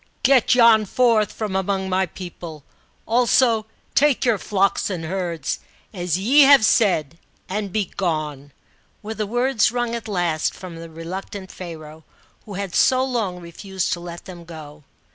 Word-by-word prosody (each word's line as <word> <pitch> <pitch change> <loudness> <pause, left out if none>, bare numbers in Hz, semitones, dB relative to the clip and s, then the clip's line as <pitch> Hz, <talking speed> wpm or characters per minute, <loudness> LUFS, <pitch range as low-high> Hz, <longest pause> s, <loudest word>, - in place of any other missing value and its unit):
" - - -41
Get 260 -2 +4
yon 230 -3 +6
forth 225 -1 +2
from 210 -4 -4
among 190 0 -1
my 190 0 +1
people; 170 -3 -9 0.4
also 230 -1 +3 0.3
take 290 -3 +3
your 230 -5 +2
flocks 195 0 0
and 175 -4 -4
herds, 170 -4 -3 0.3
as 175 -3 -1
ye 250 +10 +5
have 275 -4 +7
said, 165 -9 +2 0.3
and 200 0 -3
be 210 +1 0
gene," 150 -6 -2 0.5
were 215 +1 -5
the 215 -1 -3
words 245 0 +2
wrung 240 -1 -2
at 235 -1 -5
last 175 -6 -1
from 180 -3 -9
the 165 0 -9
reluctant 185 +4 -7
Pharaoh, 160 -3 -9 0.4
who 205 -3 -8
had 195 -2 -4
sc - - +4
long 240 -8 -1
refused 185 +2 -4
to 175 - -4
let 170 0 -9
them 175 -2 -10
go. 155 -3 -11
190 Hz, 160 wpm, -22 LUFS, 170-220 Hz, 0.5 s, have